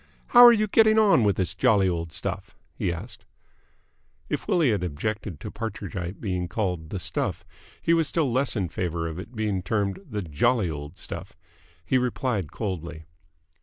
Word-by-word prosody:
"How 245 0 +9
are 240 - +11
you 215 -2 +3
getting 220 +1 +4
on 205 - +5
with 100 -3 +3
the 95 - +1
jolly 105 -1 +2
old 85 -2 -2
stuff?" - - -5 0.2
he 85 - -1
asked. 85 +8 -7 1.1
If - - -3
Willie 160 -8 +3
had 100 -4 0
objected 90 +1 -3
to - - -7
Partridgite 100 -4 -5
being 90 -4 -2
called 90 -5 -2
"the 95 - -4
stuff," - - -2 0.4
he 165 - +3
was 165 -2 +3
still 150 -6 0
less 130 +2 +1
in 95 -5 -1
favour 85 -2 -2
of 80 +1 -6
its 95 - -8
being 105 -5 -1
termed 100 0 -1
"the 105 -2 -3
jolly 85 - +1
old 75 +2 -7
stuff." - - -8 0.5
He 130 - +2
replied 125 - -1
coldly. 85 -6 -5
100 Hz, 170 wpm, -26 LUFS, 85-125 Hz, 1.1 s, are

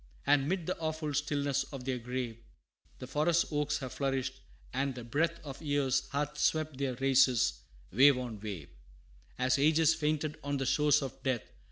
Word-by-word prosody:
And 140 0 +3
'mid 185 -2 -1
the 180 - -1
awful 155 -2 -2
stillness 145 -1 0
of 135 -3 -8
their 130 -2 -1
grave, 120 -1 -4 0.6
The - - -7
forest 160 +5 +2
oaks 150 0 0
have 130 -4 -6
flourished; 130 -1 -2 0.3
and 135 0 -1
the 125 - -7
breath 160 +8 0
Of 140 -1 -8
years 140 -3 0
hath 145 +1 -2
swept 155 -3 +1
their 135 -3 -1
races, 130 - +3 0.3
wave 135 +6 +6
on 120 -4 -5
wave, 100 -9 -6 0.7
As 130 +1 +2
ages 160 +2 +4
fainted 155 -1 -1
on 145 0 -1
the 135 - -2
shores 150 +1 +3
of 135 - -7
death. 130 -4 0
140 Hz, 170 wpm, -31 LUFS, 130-150 Hz, 0.7 s, wave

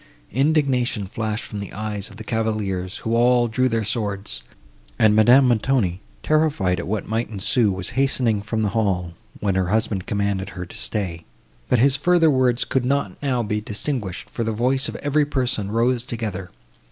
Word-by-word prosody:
Indignation 135 -5 +1
flashed 110 +3 -3
from 105 - -6
the 100 - -7
eyes 105 -1 -4
of - - -13
the 110 - -8
cavaliers, 105 -5 -2
who 115 +1 +1
all 120 0 +4
drew 130 +3 +1
their 115 -1 0
swords; 100 - -2 0.6
and 110 -1 +4
Madame 125 +5 +6
Montoni, 110 -6 +1 0.2
terrified 145 - +1
at - - -5
what 105 +1 -2
might 115 +2 -1
ensue, 105 +1 +1
was 95 -1 -4
hastening 130 -5 +1
from 110 +1 -2
the 105 - +1
hall, 95 -6 -1 0.3
when 100 -2 +1
her 95 -1 +1
husband 105 -2 0
commanded 100 -1 -1
her 90 - -4
to 85 - -12
stay; 90 -6 -3 0.5
but 125 - +4
his 135 +3 +4
further 165 +1 +4
words 125 -2 +2
could 130 - 0
not 125 -7 -1
now 130 -4 0
be 105 0 -2
distinguished, 105 -2 -4
for 115 - -4
the 115 - -1
voice 130 +5 +1
of - - -7
every 145 +1 +1
person 125 -8 -1
rose 120 +2 +1
together. 105 -7 -5
110 Hz, 175 wpm, -22 LUFS, 100-125 Hz, 0.6 s, Madame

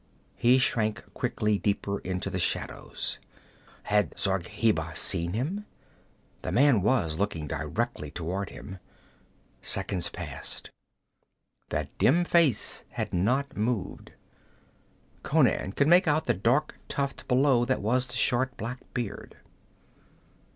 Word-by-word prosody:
He 125 +2 +5
shrank 110 -4 +1
quickly 105 -1 0
deeper 100 -1 -1
into 90 0 -3
the - - -2
shadows. - - -2 0.6
Had 105 0 +1
Zargheba 95 -3 0
seen 85 -1 +1
him? 175 - -2 0.7
The - - -3
man 130 -5 +5
was 95 -8 +1
looking 90 -6 -1
directly 75 +1 -3
toward 90 +6 -3
him. 95 -2 -9 0.8
Seconds 90 -3 0
passed. - - -6 1.0
That 75 -1 -3
dim 170 +7 +4
face 165 -11 +3
had - - -4
not 130 +10 +1
moved. 110 -1 -2 1.1
Conan 95 - +2
could 140 - +2
make 175 +2 +6
out 155 +1 +2
the - - +3
dark 120 +11 +1
tuft 140 -1 -3
below 130 -1 +4
that 130 +2 +1
was 125 +4 +2
the 120 - -7
short 125 +2 +1
black 120 +3 -4 0.2
beard. 120 -5 -5
110 Hz, 115 wpm, -28 LUFS, 95-130 Hz, 1.1 s, make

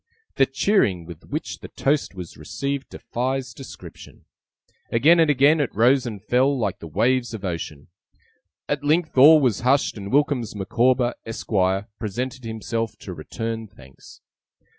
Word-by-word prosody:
The 135 - +4
cheering 130 - +1
with 85 -2 -11
which - - -4
the - - -9
toast 140 -6 -1
was 90 -3 -8
received 140 +6 -4
defies 130 0 -3
description. 135 - -12 0.7
Again 155 +9 +5
and 160 -2 +4
again 145 +3 +4
it 145 - +1
rose 125 +4 +4
and 105 -4 -7
fell, 130 +5 +2
like 100 -5 -2
the 85 - -8
waves 120 - +1
of 100 -2 -7
ocean. 80 -5 -5 0.8
At 145 -1 -2
length 155 +2 +1
all 150 +4 +8
was 125 -8 +1
hushed, 130 0 +2
and 100 -1 -7
WILKINS 140 -5 +1
MICAWBER, 120 +5 +1
ESQUIRE, 95 -3 0
presented 120 +4 -4
himself 115 0 -3
to - - -8
return 115 -1 -5
thanks. 65 -9 -17
120 Hz, 145 wpm, -23 LUFS, 105-135 Hz, 0.8 s, all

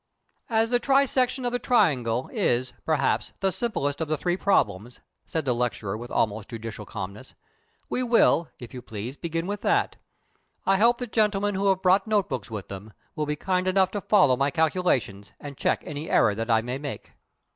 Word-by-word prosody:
"As 225 0 +1
the 245 - +3
trisection 265 -1 +2
of 245 - 0
the 245 - -1
triangle 130 - +2
is, 125 +1 0
perhaps, 150 -4 +1
the 195 -1 +1
simplest 165 - -2
of 160 - -1
the 155 0 -1
three 175 +3 0
problems," 120 - 0 0.3
said 160 -2 -2
the 125 - +2
lecturer, 120 -4 -2
with 120 +2 -7
almost 110 -1 -1
judicial 110 -2 -7
calmness, 100 +4 -7 0.5
"we 255 - -2
will, 230 -9 +3
if 120 -3 -11
you 125 - -7
please, 115 +3 -6
begin 165 +1 -3
with 205 +2 -4
that. - - +1 0.7
I 195 0 +3
hope 235 +4 +4
that 245 -3 -6
gentlemen 205 -2 +1
who 195 +1 0
have 190 -1 +1
brought 190 +2 +4
note 210 -3 +1
books 125 -7 -4
with 105 -4 -6
them 100 +2 -9 0.2
will 150 -1 -2
be 150 - -1
kind 185 +3 -1
enough 190 0 +3
to 205 - -3
follow 190 -13 +4
my 140 +2 +1
calculations 145 - 0
and 145 -1 -8
check - - 0
any 150 +2 -6
error 105 - +4
that 115 +3 -4
I 110 -1 +4
may 125 +3 -4
make." 145 -1 -7
150 Hz, 190 wpm, -25 LUFS, 120-200 Hz, 0.7 s, hope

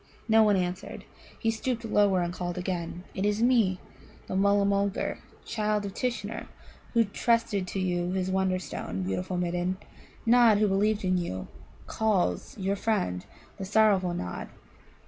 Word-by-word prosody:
No 220 0 +6
one 210 -2 +5
answered. 180 0 -3 0.3
He 225 - +1
stooped 235 +1 -3
lower, 200 -4 +3
and 175 0 -3
called 175 0 -4
again. 180 -1 -3
"It 190 - -3
is 210 +2 +1
me, 225 -7 +3 0.5
the - - -4
Mulla 200 +1 +3
mulgar, 200 0 0 0.3
child 210 -2 -1
of 195 - -5
Tishnar, 235 -4 -3 0.5
who 230 - +6
trusted 215 -2 0
to 195 - -3
you 175 -1 0
his 190 0 -1
Wonderstone, 185 - -1
beautiful 95 - -2
Midden. 175 +1 -1 0.5
Nod, 230 -2 +6
who 210 0 +3
believed 205 +1 +1
in 185 0 +2
you, 95 - -4 0.4
calls 200 - 0
your 195 0 0
friend, 140 - -1 0.3
the 195 - -5
sorrowful 195 -3 +3
Nod!" 90 - -5
195 Hz, 145 wpm, -28 LUFS, 180-215 Hz, 0.5 s, No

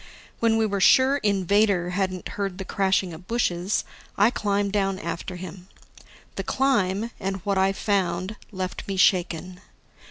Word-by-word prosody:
When 225 -1 +3
we 225 - +2
were 200 -2 -1
sure 265 +8 +5
Invader 200 -4 +2
hadn't 185 -1 -2
heard 195 -3 -3
the 190 - -5
crashing 190 -2 +1
of 170 +3 -12
bushes, 195 -5 0 0.3
I 210 +4 +5
climbed 200 -3 0
down 195 -2 +1
after 170 +1 -5
him. 180 0 -9 0.7
The - - -2
climb, 230 -5 +1
and 195 +1 -2
what 200 -2 +1
I 190 0 +3
found, 190 -1 -1 0.2
left 185 -2 -5
me 195 -1 -3
shaken. 180 -1 +1
195 Hz, 150 wpm, -25 LUFS, 185-205 Hz, 0.7 s, sure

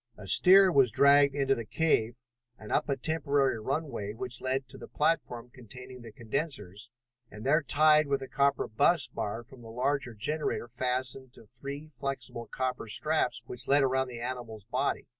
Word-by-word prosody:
A 105 - -10
steer 190 - +6
was 135 -5 +4
dragged 140 +4 +5
into 135 -1 +2
the 115 - -4
cave 120 -3 0 0.4
and 105 - -11
up - - 0
a 140 - 0
temporary 140 -4 0
runway 135 -4 -3
which 125 +2 -6
led 130 +1 -2
to - - -10
the - - -10
platform 125 -6 -1
containing 125 +1 -10
the 115 -1 -11
condensers, 110 - -5 0.4
and 105 +2 -10
there 155 +4 +3
tied 155 +1 +4
with 140 -1 0
the 135 - -6
copper 140 0 +1
bus 140 +4 +2
bar 115 -1 -5
from 130 +1 -16
the 115 - -11
larger 125 +1 -2
generator 150 +3 -2
fastened 125 +1 -3
to 115 - -16
three 140 +6 -8
flexible 135 -5 -5
copper 130 -3 -3
straps 125 -1 0
which 125 - -8
led 140 +1 +4
around 130 0 +1
the 120 -2 -8
animal's 120 -4 -6
body. 130 +5 -1
130 Hz, 175 wpm, -29 LUFS, 115-140 Hz, 0.4 s, steer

